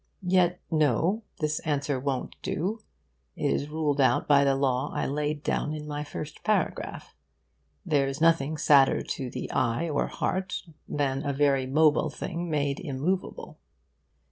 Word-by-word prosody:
Yet 180 Hz, -1 st, +3 dB
no, 160 Hz, -, +2 dB, 0.2 s
this 155 Hz, 0 st, 0 dB
answer 145 Hz, -2 st, -1 dB
won't 130 Hz, -1 st, -3 dB
do. 195 Hz, +8 st, -2 dB, 0.6 s
It -, -, 0 dB
is 145 Hz, -, -1 dB
ruled 150 Hz, -2 st, 0 dB
out 130 Hz, -, +3 dB
by 140 Hz, -1 st, +6 dB
the 135 Hz, -1 st, +3 dB
law 130 Hz, -2 st, 0 dB
I -, -, 0 dB
laid 150 Hz, +1 st, -2 dB
down 150 Hz, -, -1 dB
in 150 Hz, 0 st, -6 dB
my 150 Hz, 0 st, -4 dB
first 150 Hz, 0 st, -7 dB
paragraph. 215 Hz, -, -1 dB, 0.7 s
There's 140 Hz, -4 st, +1 dB
nothing 160 Hz, -2 st, +3 dB
sadder 140 Hz, -2 st, +5 dB
to 130 Hz, -3 st, -4 dB
eye 120 Hz, +7 st, 0 dB
or 155 Hz, -, 0 dB
heart 190 Hz, +1 st, -2 dB, 0.3 s
than 135 Hz, -1 st, -1 dB
a 140 Hz, -, -1 dB
very 135 Hz, -2 st, +2 dB
mobile 155 Hz, +2 st, +3 dB
thing 170 Hz, +3 st, -5 dB
made 145 Hz, -2 st, 0 dB
immovable. 175 Hz, +3 st, -3 dB
150 Hz, 145 wpm, -27 LUFS, 140-160 Hz, 0.7 s, by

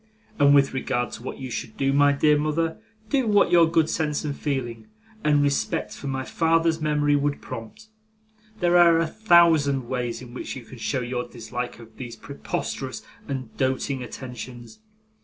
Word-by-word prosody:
And 145 Hz, 0 st, +6 dB
with 140 Hz, -1 st, +4 dB
regard 125 Hz, -2 st, -1 dB
to -, -, -8 dB
what 125 Hz, -, -6 dB
you 130 Hz, -2 st, -7 dB
should 110 Hz, -, -5 dB
do, 135 Hz, 0 st, +1 dB
my 145 Hz, 0 st, +5 dB
dear 150 Hz, +1 st, +3 dB
mother, 155 Hz, +2 st, -1 dB, 0.3 s
do 265 Hz, -4 st, +1 dB
what 205 Hz, -4 st, +4 dB
your 170 Hz, -2 st, +6 dB
good 165 Hz, -2 st, +3 dB
sense 150 Hz, -2 st, -1 dB
and 145 Hz, -2 st, -2 dB
feeling, 120 Hz, -7 st, -3 dB, 0.4 s
and 145 Hz, -1 st, +3 dB
respect 140 Hz, -1 st, -1 dB
for 140 Hz, -, -8 dB
my 135 Hz, -1 st, -2 dB
father's 165 Hz, +1 st, +1 dB
memory, 150 Hz, -1 st, +2 dB
would 145 Hz, 0 st, 0 dB
prompt. 115 Hz, -, -9 dB, 0.8 s
There 175 Hz, 0 st, +4 dB
are 170 Hz, -1 st, +6 dB
a 165 Hz, -, +2 dB
thousand 160 Hz, -, +4 dB
ways 125 Hz, -2 st, -2 dB
in 125 Hz, -1 st, -11 dB
which 125 Hz, -, -6 dB
you 125 Hz, -3 st, -9 dB
can 125 Hz, +1 st, -12 dB
show 130 Hz, +3 st, -1 dB
your 125 Hz, 0 st, -3 dB
dislike 120 Hz, +1 st, -6 dB
of 115 Hz, -1 st, -15 dB
these 120 Hz, -3 st, -7 dB
preposterous 140 Hz, +4 st, -5 dB, 0.2 s
and 130 Hz, -4 st, -5 dB
doting 130 Hz, 0 st, -1 dB
attentions. 125 Hz, -, -8 dB
140 Hz, 175 wpm, -24 LUFS, 125-160 Hz, 0.8 s, And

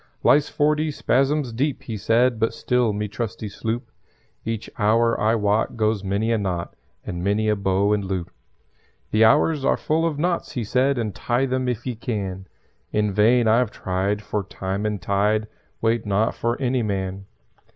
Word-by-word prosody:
"Lies 145 Hz, 0 st, +4 dB
forty 150 Hz, +1 st, +1 dB
spasms 135 Hz, -1 st, +1 dB
deep," 135 Hz, +4 st, -1 dB
he 115 Hz, -, -5 dB
said; 115 Hz, +3 st, +2 dB
"But 115 Hz, -, 0 dB
still 125 Hz, -3 st, +1 dB
me 105 Hz, +1 st, -2 dB
trusty 105 Hz, +1 st, -4 dB
sloop 115 Hz, +3 st, -4 dB, 0.5 s
Each 115 Hz, -1 st, -3 dB
hour, 115 Hz, +2 st, +3 dB
I 110 Hz, +2 st, +3 dB
wot, 105 Hz, +1 st, 0 dB
goes 110 Hz, -2 st, +1 dB
many 100 Hz, +4 st, 0 dB
a 115 Hz, -, +2 dB
knot 90 Hz, -4 st, -3 dB, 0.3 s
And 90 Hz, 0 st, -4 dB
many 105 Hz, +3 st, +1 dB
a 105 Hz, -, +3 dB
bow 100 Hz, +1 st, +1 dB
and 105 Hz, -1 st, 0 dB
loop. 95 Hz, -2 st, -3 dB, 0.8 s
"The 110 Hz, +1 st, +4 dB
hours 150 Hz, +4 st, +3 dB
are -, -, +2 dB
full 160 Hz, +2 st, +1 dB
of 155 Hz, -3 st, -3 dB
knots," 175 Hz, +3 st, -1 dB
he 120 Hz, -, -2 dB
said, 130 Hz, +5 st, +1 dB
"Untie 120 Hz, +3 st, -1 dB
them 130 Hz, -1 st, -1 dB
if 120 Hz, -2 st, -3 dB
ye 125 Hz, -, -2 dB
can. 100 Hz, -5 st, -4 dB, 0.4 s
In 105 Hz, -1 st, +1 dB
vain 115 Hz, +4 st, +4 dB
I've 115 Hz, +1 st, +3 dB
tried, 100 Hz, +2 st, -2 dB
for 105 Hz, -1 st, -2 dB
Time 95 Hz, +2 st, -3 dB
and 105 Hz, -1 st, -2 dB
Tied 105 Hz, +4 st, +1 dB, 0.4 s
Wait 115 Hz, 0 st, +2 dB
not 105 Hz, +2 st, +1 dB
for 120 Hz, +2 st, -2 dB
any 130 Hz, -1 st, +1 dB
man. 95 Hz, -2 st, -3 dB
110 Hz, 170 wpm, -23 LUFS, 100-125 Hz, 0.8 s, Lies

